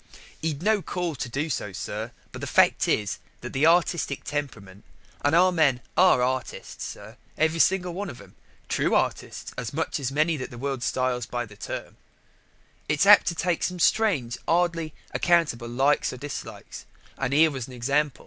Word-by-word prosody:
"He'd 160 Hz, -1 st, -2 dB
no 215 Hz, 0 st, +3 dB
call 175 Hz, -2 st, -3 dB
to 125 Hz, -2 st, -5 dB
do 145 Hz, +6 st, -2 dB
so, 105 Hz, -8 st, -3 dB
sir; 105 Hz, +4 st, -4 dB, 0.2 s
but -, -, -8 dB
the -, -, -4 dB
fact -, -, +4 dB
is 105 Hz, -2 st, 0 dB, 0.2 s
that -, -, -7 dB
the 140 Hz, +4 st, +3 dB
artistic 170 Hz, -4 st, +2 dB
temperament 110 Hz, -10 st, -5 dB, 0.4 s
and 145 Hz, +2 st, +3 dB
our 185 Hz, +2 st, +5 dB
men 145 Hz, -7 st, +3 dB, 0.2 s
are 180 Hz, -9 st, +5 dB
artists, 130 Hz, 0 st, -3 dB
sir, -, -, -8 dB, 0.2 s
every 160 Hz, +1 st, +1 dB, 0.3 s
man 200 Hz, +3 st, -4 dB
of -, -, -9 dB
them 100 Hz, -2 st, -15 dB, 0.3 s
true -, -, +1 dB
artists -, -, -2 dB
as 120 Hz, 0 st, -5 dB
much 160 Hz, +1 st, -2 dB
as 135 Hz, -2 st, -2 dB
many 155 Hz, +3 st, +1 dB
that 130 Hz, -, -5 dB
the 120 Hz, -, -10 dB
world 135 Hz, 0 st, -3 dB
styles 125 Hz, -1 st, -1 dB
by 120 Hz, 0 st, -3 dB
that 105 Hz, -2 st, -16 dB
term -, -, -6 dB, 0.9 s
it's 150 Hz, +5 st, +3 dB
apt 205 Hz, +1 st, +8 dB
to 170 Hz, -, 0 dB
take 175 Hz, 0 st, 0 dB
some 180 Hz, -, -1 dB
strange 170 Hz, -, +2 dB
'ardly 165 Hz, -2 st, +1 dB, 0.2 s
accountable 155 Hz, -9 st, +1 dB
likes 135 Hz, +4 st, +2 dB
or 130 Hz, -, -7 dB
dislikes, 145 Hz, +2 st, -8 dB, 0.3 s
and 135 Hz, -1 st, -1 dB
here 155 Hz, +3 st, +5 dB
was 130 Hz, -4 st, -5 dB
an 130 Hz, -, -11 dB
example. 140 Hz, +3 st, 0 dB
145 Hz, 175 wpm, -26 LUFS, 125-165 Hz, 0.9 s, apt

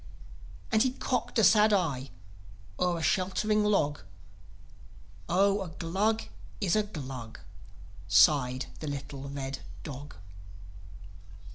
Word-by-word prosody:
As 220 Hz, -1 st, +4 dB
he 255 Hz, +1 st, +2 dB
cocked 250 Hz, -3 st, -2 dB
a 225 Hz, -, +4 dB
sad 210 Hz, +2 st, +6 dB
eye 150 Hz, -10 st, 0 dB, 0.7 s
o'er 180 Hz, -1 st, +1 dB
a 165 Hz, -, -4 dB
sheltering 195 Hz, +6 st, +1 dB
log, 155 Hz, -9 st, +1 dB, 1.3 s
"Oh, 195 Hz, +3 st, +3 dB
a 190 Hz, -, -4 dB
Glug 195 Hz, +8 st, -1 dB, 0.4 s
is 175 Hz, -, +1 dB
a 215 Hz, -, +4 dB
Glug!" 135 Hz, -, -7 dB, 0.7 s
sighed 125 Hz, +8 st, +4 dB
the 155 Hz, -, -6 dB
little 140 Hz, -1 st, -6 dB
red 135 Hz, -1 st, -5 dB, 0.2 s
dog. 145 Hz, -, -8 dB
165 Hz, 110 wpm, -29 LUFS, 140-210 Hz, 1.3 s, sad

